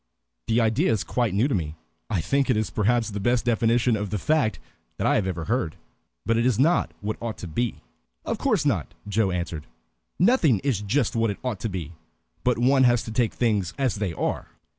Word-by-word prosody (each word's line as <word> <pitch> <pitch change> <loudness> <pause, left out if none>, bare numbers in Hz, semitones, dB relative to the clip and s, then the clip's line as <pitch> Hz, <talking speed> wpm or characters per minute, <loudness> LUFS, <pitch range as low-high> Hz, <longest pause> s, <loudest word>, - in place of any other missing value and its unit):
"The 115 +1 +2
idea 115 +9 +2
is 105 -4 0
quite 120 -3 0
new 110 +7 +3
to 140 - -1
me, 80 -5 -2 0.3
I 100 -7 0
think 140 - +1
it 125 - +3
is 110 - -1
perhaps 115 +1 +1
the 105 - -4
best 120 +4 +1
definition 120 0 +2
of 105 -1 -3
the 105 - -1
fact 150 - +1 0.4
that - - -2
I - - +3
ever 95 -5 -2
heard. 105 -8 -1 0.5
But 115 - +2
it 115 - +2
is 125 - +2
not 160 +8 +3
what 105 +1 -4
ought 115 -2 -4
to 90 - -7
be." 115 - -2 0.4
"Of - - -2
course - - +1
not," - - -1
Joe 105 0 +1
answered. 85 -4 -4 0.5
"Nothing 180 - +4
is 130 -8 0
just 115 +5 0
what 115 -1 +2
it 100 - -3
ought 125 -6 -2
to 115 - -3
be. 85 -4 -5 0.5
But 125 -2 +2
one 130 +3 +4
has 120 -1 +3
to 110 - -7
take 115 -1 0
things 105 -8 0
as 135 -4 +1
they 100 -3 -1
are." 80 - -2
115 Hz, 210 wpm, -25 LUFS, 100-125 Hz, 0.5 s, Nothing